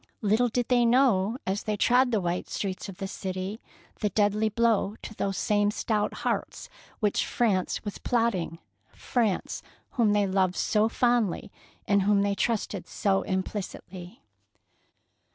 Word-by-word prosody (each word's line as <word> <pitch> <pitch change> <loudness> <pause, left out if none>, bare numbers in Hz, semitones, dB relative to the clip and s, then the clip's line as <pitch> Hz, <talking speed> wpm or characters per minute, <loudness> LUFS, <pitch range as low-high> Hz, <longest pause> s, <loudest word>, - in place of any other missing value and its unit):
Little 220 +4 +3
did 245 +1 -1
they 245 -1 +4
know, 235 -3 +3
as 195 +2 -1
they 215 -1 -2
trod 250 +4 +4
the 225 -3 +1
white 175 -1 -2
streets 195 0 -4
of 185 - -9
the 195 - -4
city, 190 +2 -5 0.4
the 210 - +1
deadly 210 +2 +2
blow 220 -2 +1
to - - -7
those 195 -3 -2
same 205 -1 +2
stout 210 0 0
hearts - - -2 0.3
which 210 -2 +2
France 205 -6 0
was 205 - -5
plotting, 225 -9 0 0.2
— 110 - -41
France, 225 -6 -1 0.3
whom 225 -4 +2
they 205 -1 +3
loved 190 -1 +1
so 215 +1 +2
fondly 240 -5 +1 0.4
and 200 -2 +4
in 190 - -1
whom 205 -1 +4
they 200 0 +1
trusted 205 -3 -1
so 195 -1 +1
implicitly. 185 +1 -5
205 Hz, 150 wpm, -27 LUFS, 190-230 Hz, 0.4 s, they